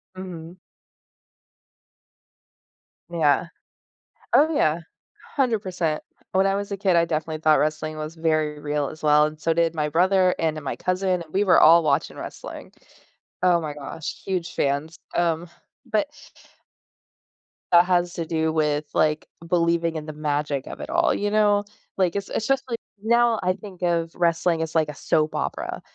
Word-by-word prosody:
Mm. 175 -2 -8 2.5
Yeah. 165 -1 +2 0.9
Oh, 315 +3 +5
yeah, 160 - +2 0.5
100%. 190 - 0 0.3
When 190 +1 +3
I 195 - +2
was 200 0 -4
a 200 - -2
kid 190 -2 +2
I 170 0 +4
definitely 155 -1 -3
thought 155 -1 +4
wrestling 155 +1 -1
was 155 +1 -6
very 155 -2 0
real 145 -1 -1
as 155 - -11
well, 150 0 +5
and 155 0 -5
so 165 +1 +1
did 165 0 +1
my 150 -2 -1
brother 185 +3 +3
and 155 -2 -1
my 140 - -4
cousin, 185 -1 0
and 155 - -20
we 195 - +3
were 185 -4 +5
all 165 +2 +7
watching 145 0 0
wrestling. - - -8 0.7
Oh 180 -2 +4
my 150 -2 -5
gosh, 150 +2 -7
huge 175 -2 -3
fans, 145 +4 -1 0.2
um, 170 0 0 0.4
but 215 +1 0 1.6
that 175 0 +7
has 175 -1 +1
to 165 - -3
do 160 0 0
with, 150 -2 +1
like, 150 0 +1 0.2
believing 170 -1 +1
in 155 -1 -4
the 155 - -6
magic 145 -2 -2
of - - -8
it - - -7
all, - - +2
you 205 0 -1
know? 205 -1 +3 0.3
Like, 185 -2 +1
it's 200 - -4
it's 220 - -2
just, 270 0 +2
like, 230 -1 -3 0.2
now, 235 +1 +3
I 185 0 +2
think 195 -2 -12
of 170 -2 0
wrestling 170 -1 +1
as, 160 0 -4
like, 155 -2 +2
a 150 - -6
soap 155 +2 0
opera. - - -3
165 Hz, 160 wpm, -24 LUFS, 155-185 Hz, 2.5 s, all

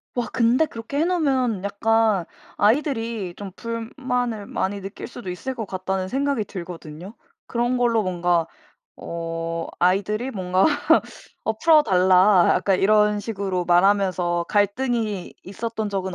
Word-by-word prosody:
와 245 - -1
근데 240 +7 +3
그렇게 275 +2 -5
해 325 - +3
놓으면 265 - 0
약간 215 -2 +1 0.3
'아이들이 225 - 0
좀 200 -2 -8
불만을 230 -1 -3
많이 200 0 -3
느낄 195 +3 -7
수도 240 -6 -8
있을 260 +9 -5
것 225 - -4
같다.'는 185 0 -3
생각이 275 -1 0
들거든요? 175 0 -8 0.3
그런 240 +1 0
걸로 230 -3 +2
뭔가 175 -2 0 0.5
어 165 0 -4
아이들이 205 +7 +1
뭔가 185 0 +1 0.8
어 220 - +1
"풀어달라." 190 - +5
약간 195 -2 +1
이런 210 0 +3
식으로 195 -4 -3
말하면서 180 -1 +2
갈등이 210 -1 0
있었던 220 +2 -4
적은 190 -2 -3
205 Hz, 285 characters per minute, -23 LUFS, 185-235 Hz, 0.8 s, 풀어달라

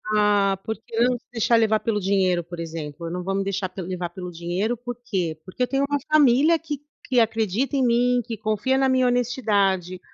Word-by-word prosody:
Ah, 205 -2 +3
porque 220 0 -5 0.2
não 245 +1 +3
se - - -25
deixar 235 0 +2
levar 220 -1 +3
pelo 215 -2 -1
dinheiro, 185 -2 +1
por 175 +1 -9
exemplo, 165 -1 -6
eu 165 - -5
não 180 0 -4
vou 195 +2 -2
me 195 - 0
deixar 195 -1 -2
pel 185 -3 -7
levar 180 -1 -4
pelo 180 +1 -7
dinheiro. 175 +7 -2
Por 245 +1 -6
quê? 175 -9 -2
Porque 190 +7 -3
eu - - +1
tenho 275 +2 0
uma 290 - +1
família 300 +2 +5
que 300 -3 -5 0.3
que 255 -4 +2
acredita 225 +4 0
em 265 -2 +2
mim, 245 +1 +3
que 225 - -5
confia 215 +5 0
na 270 - +3
minha 260 -1 +3
honestidade, 205 -7 +1
215 Hz, 215 wpm, -23 LUFS, 185-245 Hz, 0.3 s, família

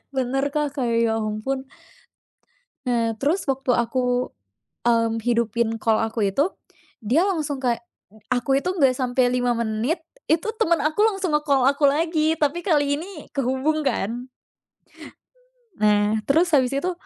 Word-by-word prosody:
Bener 265 +2 0
Kak, 295 -2 -1
kayak 235 -3 0
ya - - +1
ampun. 220 +6 -3 1.2
Nah 230 -2 +1
terus 330 +7 +1
waktu 265 -1 0
aku, 245 +1 0 0.6
mmm, 230 -1 +2
hidupin 235 -1 0
call 220 -1 +2
aku 220 -2 0
itu, 285 - +2 0.6
dia 310 - +2
langsung 300 -7 -2
kayak, 235 -1 0 0.3
eee, 220 0 -20
aku 255 +2 +2
itu 360 - -3
nggak 270 -8 +3
sampai 255 -1 +1
5 245 -1 +1
menit, 235 +8 -1 0.3
itu 325 +5 +2
temen 340 0 +3
aku 310 +6 -1
langsung 390 -5 -2
nge-call 285 -3 +2
aku 285 0 +2
lagi 315 +2 +1
tapi 300 +3 +1
kali 290 -4 +2
ini 360 +4 -8 0.2
kehubung 275 +4 0
kan. 240 +2 -2 1.5
Nah 210 +1 +3
terus 325 +4 +3
habis 260 -1 +3
itu, 355 +7 0
265 Hz, 140 wpm, -23 LUFS, 235-300 Hz, 1.5 s, nggak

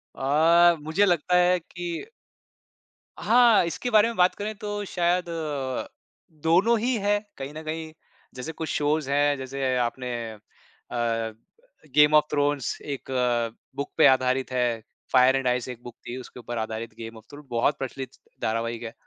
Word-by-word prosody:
अ, 165 +5 +4
मुझे 160 +7 +2
लगता 180 -1 +2
है 180 0 +4
कि 175 - -6 1.1
हाँ, 235 -4 +5
इसके 170 +9 -3
बारे 215 +1 +6
में 235 - -4
बात 180 0 +4
करें 215 +1 -4
तो 205 0 -4
शायद 175 -1 0
अ, 145 -6 -3 0.6
दोनों 190 +9 +4
ही 245 +2 0
हैं 205 +1 +2 0.2
कहीं 135 +2 -6
न 155 +1 -8
कहीं। 160 0 -5 0.4
जैसे 130 +6 -5
कुछ 160 0 -6
शोज़ 150 -1 0
हैं, 145 0 +2
जैसे 130 0 -2
आपने 125 +1 -2 0.2
अ, 110 - -11 1.6
गेम 150 0 +6
ऑफ 150 - +7
थ्रोन्स 145 -2 0
एक 140 -2 -6
अ, 120 -3 0 0.2
बुक 140 +1 -4
पे 160 - +6
आधारित 130 0 +2
है, 120 -3 0 0.3
फायर 130 +1 +6
एंड 135 -1 0
आइस 125 0 0
एक 120 -1 -8
बुक 120 -1 -10
थी, 120 - -5
उसके 125 - -11
ऊपर 120 0 -6
आधारित 110 +1 -4
गेम 115 0 -8
ऑफ 110 - -14
थ्रो 145 +1 -11
बहुत 120 +5 +1
प्रचलित 135 -1 -5 0.3
धारावाहिक 115 +1 -2
है, 115 -1 -6
145 Hz, 165 wpm, -25 LUFS, 125-170 Hz, 1.6 s, ऑफ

